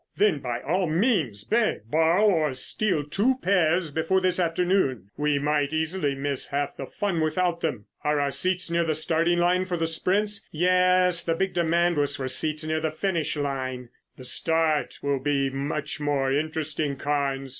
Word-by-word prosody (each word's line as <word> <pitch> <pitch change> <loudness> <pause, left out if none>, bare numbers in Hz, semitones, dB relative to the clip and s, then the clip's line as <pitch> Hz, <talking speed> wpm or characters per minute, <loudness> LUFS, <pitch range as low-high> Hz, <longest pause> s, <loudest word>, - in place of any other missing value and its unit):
"Then 200 -8 +3
by 120 -3 -4
all 180 +5 0
means 160 - +1
beg, 230 0 +1
borrow 165 +5 +3
or 160 -9 +2
steal 175 +3 -1
two 205 - +1
pairs 175 -3 +2
before 165 +5 +1
this 185 -1 0
afternoon. 165 - 0
We 150 -1 +1
might 145 0 0
easily 160 -2 -1
miss 140 0 -3
half 145 0 -2
the 135 - -6
fun 190 -1 -2
without 170 +2 0
them. 125 -10 -2 0.2
Are 150 0 +1
our 140 -1 0
seats 180 +5 -2
near 170 0 +2
the 160 -2 0
starting 165 +2 +1
line 180 +2 +2
for 180 -1 -2
the 165 - 0
sprints?" 200 +6 0
"Yes. 180 +1 +3
The 165 - 0
big 190 +2 -1
demand 170 0 +2
was 145 -1 +1
for 130 - -3
seats 155 +4 -1
near 155 0 0
the 160 - 0
finish 160 -1 -1
line." 130 -4 -3 0.3
"The 130 - -10
start 160 -1 0
will 140 -1 0
be 135 0 0
much 145 +2 -3
more 140 -2 0
interesting, 155 -1 -1
Carnes. 140 -1 -1
160 Hz, 175 wpm, -25 LUFS, 140-180 Hz, 0.3 s, Then